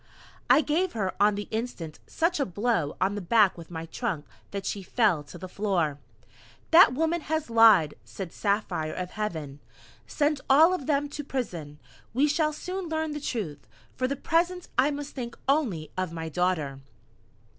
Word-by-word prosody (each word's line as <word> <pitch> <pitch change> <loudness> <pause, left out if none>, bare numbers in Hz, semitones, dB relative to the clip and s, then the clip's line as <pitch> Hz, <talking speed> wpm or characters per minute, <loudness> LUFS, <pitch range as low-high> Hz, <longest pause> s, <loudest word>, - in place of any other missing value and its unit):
I - - +7
gave 340 +5 0
her 195 -4 -1
on 205 0 +5
the 205 0 -5
instant 220 -9 -4
such 335 0 0
a 280 - +2
blow 190 -6 -1
on 195 +2 +1
the 205 - -4
back 205 +1 +4
with 170 -2 -11
my 165 -1 -5
trunk 170 - -3 0.2
that 200 -1 -5
she 200 - -2
fell 195 -4 +2
to - - -11
the 185 - -7
floor. 180 -7 -1 0.7
"That 330 -6 +8
woman 325 +3 +1
has 310 -4 -2
lied," 220 -10 +6
said 190 -4 -7
Saphire 200 -7 -1
of 180 0 -4
Heaven. 160 -10 -4 0.5
"Send 295 -2 0
all 315 +6 +7
of 320 -8 -4
them 290 -1 +1
to 295 - -6
prison. 175 - -4 0.4
We 280 +4 +4
shall 305 +1 +1
soon 365 +3 -5
learn 315 -1 -1
the 295 0 -5
truth. 170 - -4 0.3
For 255 - 0
the 280 - -2
present 345 +5 0
I 260 +3 +4
must 290 0 -5
think 240 -3 -6
only 245 - 0
of 185 -2 -2
my 160 -1 -5
Daughter!" 160 -5 -1
220 Hz, 175 wpm, -27 LUFS, 175-295 Hz, 0.7 s, That